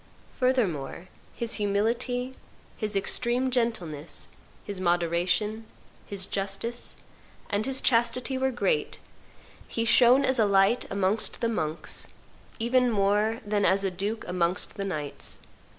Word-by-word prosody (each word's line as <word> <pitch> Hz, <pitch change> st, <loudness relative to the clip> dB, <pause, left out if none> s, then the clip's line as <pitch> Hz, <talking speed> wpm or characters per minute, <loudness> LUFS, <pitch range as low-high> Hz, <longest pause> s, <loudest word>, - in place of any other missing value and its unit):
Furthermore, 185 Hz, -, 0 dB, 0.3 s
his 235 Hz, -1 st, -2 dB
humility, 235 Hz, +5 st, 0 dB, 0.4 s
his 215 Hz, -2 st, -2 dB
extreme 245 Hz, +6 st, +1 dB
gentleness, 180 Hz, -, -2 dB, 0.3 s
his 200 Hz, -2 st, -5 dB
moderation, 180 Hz, +5 st, +1 dB, 0.4 s
his 195 Hz, -2 st, -4 dB
justice, 200 Hz, +5 st, -3 dB, 0.6 s
and 205 Hz, +3 st, 0 dB
his 265 Hz, 0 st, +1 dB
chastity 250 Hz, +2 st, +2 dB
were 265 Hz, 0 st, +1 dB
great; 265 Hz, -, 0 dB, 0.7 s
he 230 Hz, -, -2 dB
shone 250 Hz, +4 st, +6 dB
as 260 Hz, -2 st, +1 dB
a 220 Hz, -, +5 dB
light 195 Hz, +5 st, +3 dB
amongst 200 Hz, +2 st, +1 dB
the 230 Hz, -, +1 dB
monks, 160 Hz, -7 st, -2 dB, 0.5 s
even 245 Hz, +2 st, +2 dB
more 210 Hz, +1 st, +1 dB
than 205 Hz, 0 st, 0 dB
as 195 Hz, 0 st, +4 dB
a 195 Hz, -, 0 dB
duke 200 Hz, +5 st, -3 dB
amongst 180 Hz, 0 st, 0 dB
the 200 Hz, -, -3 dB
knights. 150 Hz, -7 st, -3 dB
210 Hz, 120 wpm, -27 LUFS, 190-240 Hz, 0.7 s, shone